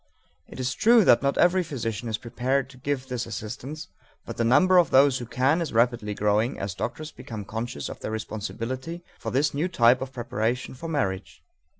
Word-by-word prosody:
It - - -11
is 130 0 -1
true 230 -2 +5
that 120 - +6
not 140 0 0
every 180 +1 +4
physician 120 - -4
is 110 - -1
prepared 125 +3 -1
to 130 - -16
give 135 0 -2
this 125 -2 -3
assistance, 135 +8 -6 0.4
but - - -7
the 115 - +1
number 165 +10 +5
of 170 -5 +3
those 135 0 +5
who 120 - -7
can 135 +8 +2
is 165 - -3
rapidly 115 -3 +1
growing 105 +5 +1
as 100 -2 -4
doctors 150 +11 -5
become 110 -3 -8
conscious 110 -9 -4
of - - -8
their - - -5
responsibility 115 +9 -5 0.2
for - - -4
this 140 +4 +1
new 150 +5 0
type 125 -7 +4
of 130 0 -5
preparation 120 0 -2
for 165 +6 -7
marriage. 95 -12 -3
125 Hz, 195 wpm, -26 LUFS, 115-145 Hz, 0.4 s, that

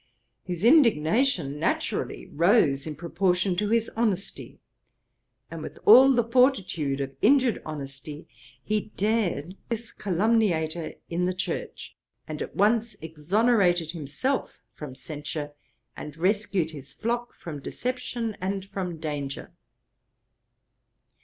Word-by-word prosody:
His 180 0 -4
indignation 220 - +4
naturally - - -1
rose 160 - +3
in 155 - -5
proportion 180 +2 0
to 210 +2 0
his 230 0 +2
honesty, 215 -4 -2 0.9
and - - -6
with - - -8
all 270 - +9
the 240 -2 +3
fortitude 220 - +2
of 135 -1 -4
injured 260 -1 +4
honesty, 145 0 -7 0.4
he 215 0 -1
dared 195 -6 0
this 230 0 -3
calumniator 180 -5 0 0.2
in 175 +1 0
the 180 0 -1
church, 465 - -4 0.3
and - - -5
at - - -5
once 220 +1 +2
exonerated 175 +1 +2
himself 175 - -3
from 145 -4 -8
censure, 145 +2 -5 0.4
and 150 0 -8
rescued 190 -2 +1
his 140 -3 -10
flock 240 +1 -3
from 155 -4 -7
deception 245 - -3
and 190 +1 -2
from 185 -3 -4
danger. 145 -3 -5
185 Hz, 115 wpm, -26 LUFS, 155-230 Hz, 0.9 s, all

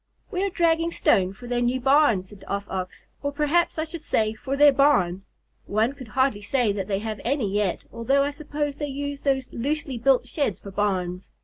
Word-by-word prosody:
"We 375 -1 -1
are 400 - +1
dragging 335 -1 +2
stone 185 - +2
for 215 +6 -12
their 240 0 -1
new 245 +2 +1
barn," 265 -7 +4
said 195 +1 -14
the - - -15
Off 200 0 -2
Ox. 185 -1 -5 0.2
"Or 285 - -1
perhaps 300 +4 +1
I 315 - 0
should 325 0 -7
say 215 -7 0
for 265 +5 -4
their 290 0 +8
barn. 195 -10 +3 0.4
One 220 +5 +1
could 265 -4 -10
hardly 260 -2 +1
say 230 +1 +1
that 195 -2 -3
they 195 -2 0
have 215 +1 -5
any 240 -6 0
yet, 205 -3 0
although 270 +5 +2
I 285 - -1
suppose 290 -1 -4
they 295 - -3
use 285 0 -4
those 265 -2 0
loosely 275 0 -2
built 265 +1 +3
sheds 275 - -1
for 200 - -10
barns. 185 -3 -1
260 Hz, 210 wpm, -25 LUFS, 205-285 Hz, 0.4 s, their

